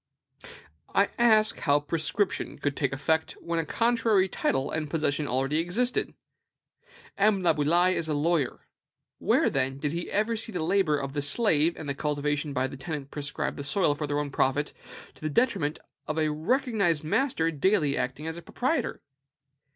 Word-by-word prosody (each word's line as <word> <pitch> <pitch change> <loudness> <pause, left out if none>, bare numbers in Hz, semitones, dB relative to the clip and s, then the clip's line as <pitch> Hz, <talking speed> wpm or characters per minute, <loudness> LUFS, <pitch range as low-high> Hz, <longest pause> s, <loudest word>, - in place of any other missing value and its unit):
I 200 - +4
ask 220 -2 +4
how 145 -2 +3
prescription 165 +6 -1
could 145 -1 -2
take 140 -3 0
effect 160 +4 0
where 170 0 -3
a 165 - -1
contrary 230 -4 +2
title 135 -6 -1
and 155 -2 -3
possession 150 -1 -1
already 135 +4 0
existed? 225 +10 -1 1.0
M. 200 -2 +3
Laboulaye 175 +3 +3
is 165 - -2
a 155 - -1
lawyer. 150 -2 0 0.5
Where, - - +3
then, 135 0 0
did 145 +1 -2
he 170 +2 -4
ever 215 +3 +1
see 225 +1 -2
the 180 -5 -2
labor 175 -3 +2
of 135 -1 -4
the 145 - -1
slave 160 0 +3
and 155 - -7
the 140 - -1
cultivation 145 +1 -1
by 130 -1 0
the 135 +1 -6
tenant 145 -2 -6
prescribe 145 0 -3
the 140 - -5
soil 145 +1 +2
for 150 0 -4
their 145 0 -1
own 145 -1 -2
profit, 140 +2 0 0.4
to - - -21
the 155 - -2
detriment 165 - +1 0.3
of 155 - -3
a 155 -1 +1
recognized 195 - +1
master 165 - +1
daily 155 -1 +2
acting 130 +4 -3
as 160 +1 -4
a - - -7
proprietor? 260 - -2
155 Hz, 170 wpm, -27 LUFS, 145-190 Hz, 1.0 s, I